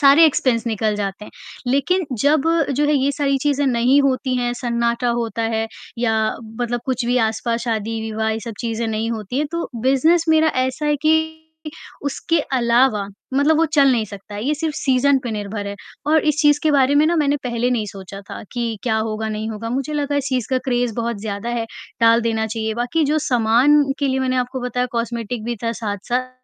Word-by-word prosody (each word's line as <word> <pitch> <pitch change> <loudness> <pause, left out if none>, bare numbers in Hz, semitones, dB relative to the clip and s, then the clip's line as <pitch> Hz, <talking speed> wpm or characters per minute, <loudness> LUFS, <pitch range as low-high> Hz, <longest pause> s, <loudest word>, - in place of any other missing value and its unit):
सारे 285 +3 +7
इक्स्पेन्स 250 -5 +1
निकल 220 -1 0
जाते 200 0 -4
हैं, - - -12 0.4
लेकिन 285 +7 +1 0.2
जब 290 0 +4 0.3
जो 295 - +2
है 300 - +2
ये 275 0 +2
सारी 275 -2 +1
चीजें 285 -1 +1
नहीं 255 +2 +3
होती 260 -1 0
हैं, 245 -1 0
सन्नाटा 235 0 0
होता 230 0 -2
है 225 0 0 0.3
या 230 -2 +1 0.5
मतलब 240 0 -1
कुछ 255 -1 -1
भी 245 - +1
आसपास 230 +1 -2
शादी-विवाह 220 -1 -2
ये 220 +1 -2
सब 230 -2 -6
चीजें 230 0 -2
नहीं 220 +1 -2
होती 225 +2 -3
हैं, 300 - 0
तो 335 - -2
बिज़नेस 310 +6 +3
मेरा 315 0 +4
ऐसा 260 +4 -2
है 295 0 +2
कि 315 0 +1 0.6
उसके 310 +3 0 0.2
अलावा 235 -3 +3 0.3
मतलब 295 +3 +3
वो 330 - +4
चल 285 -4 +4
नहीं 230 -3 +1
सकता 200 +1 -10
है, 210 - -4
ये 295 +3 +1
सिर्फ़ 315 0 -3
सीज़न 270 0 +3
पे 235 - -3
निर्भर 205 -1 -4
है 200 0 -5 0.3
और 310 +1 +4
इस 300 0 +2
चीज़ 295 0 +4
के 310 - +3
बारे 275 0 +4
में 300 +2 +5
ना 340 - +2
मैंने 290 -2 +2
पहले 240 0 0
नहीं 220 -4 0
सोचा 195 0 -9
था - - -7
कि 235 -3 -2
क्या 220 -3 +1
होगा, 220 0 -2
नहीं 215 +1 -3
होगा, 225 +1 -5
मुझे 275 +4 -2
लगा 290 -1 -1
इस 285 - 0
चीज़ 255 -4 -1
का 260 - +2
क्रेज़ 245 -3 0
बहुत 235 -2 -2
ज़्यादा 210 +1 -4
है, 235 -1 -2 0.3
टाल 230 0 +5
देना 225 -1 0
चाहिए, 220 0 -3
बाकी 245 +7 0
जो 300 +2 +1
सामान 250 +2 +4 0.2
के 280 -2 0
लिए 265 0 0
मैंने 255 -1 0
आपको 250 +1 -2
बताया 250 0 -1
कॉस्मेटिक 235 -1 -3
भी 240 +1 -3
था 230 - 0
साथ-साथ, 235 +4 -3
245 Hz, 205 wpm, -20 LUFS, 225-280 Hz, 0.6 s, सारे